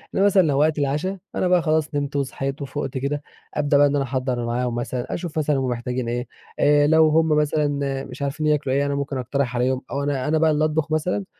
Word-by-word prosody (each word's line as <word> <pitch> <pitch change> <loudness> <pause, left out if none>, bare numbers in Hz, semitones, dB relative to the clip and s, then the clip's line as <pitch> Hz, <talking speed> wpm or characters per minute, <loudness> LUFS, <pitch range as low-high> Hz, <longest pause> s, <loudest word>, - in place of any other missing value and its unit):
إنما 195 - +3
مثلًا 200 -1 +5
لو 145 -5 +1
وقت 155 0 +2
العشا 150 +8 -1 0.2
أنا 185 - +1
بقى 180 -1 +4
خلاص 155 -2 0
نمت 145 0 -2
وصحيت 135 0 -3
وفُقت 140 -1 -4
كده، 140 +2 -2 0.3
أبدأ 145 -1 +2
بقى 145 0 +6
إن 140 - 0
أنا 140 - +1
أحضّر 125 -1 -2
معاهم 120 0 -1
مثلًا، 120 +1 -3
أشوف 170 -2 -5
مثلًا 150 -1 +1
هُم 135 - -1
محتاجين 125 0 -3
إيه، 120 +1 -3 0.3
آآ 145 0 +4
لو 160 0 +5
هُم 160 +1 +3
مثلًا 145 -3 0
مش 130 +2 -10
عارفين 145 +2 -1
ياكلوا 145 -3 +1
إيه 140 +1 +2
أنا 140 - -1
ممكن 140 -1 -3
أقترح 130 0 -2
عليهم، 130 +1 +1
أو 140 - -2
أنا 140 -2 -1
أنا 155 +1 +2
بقى 160 0 +3
اللي 155 0 +2
أطبُخ 155 0 -1
مثلًا، 180 +5 0
145 Hz, 225 wpm, -23 LUFS, 135-155 Hz, 0.3 s, بقى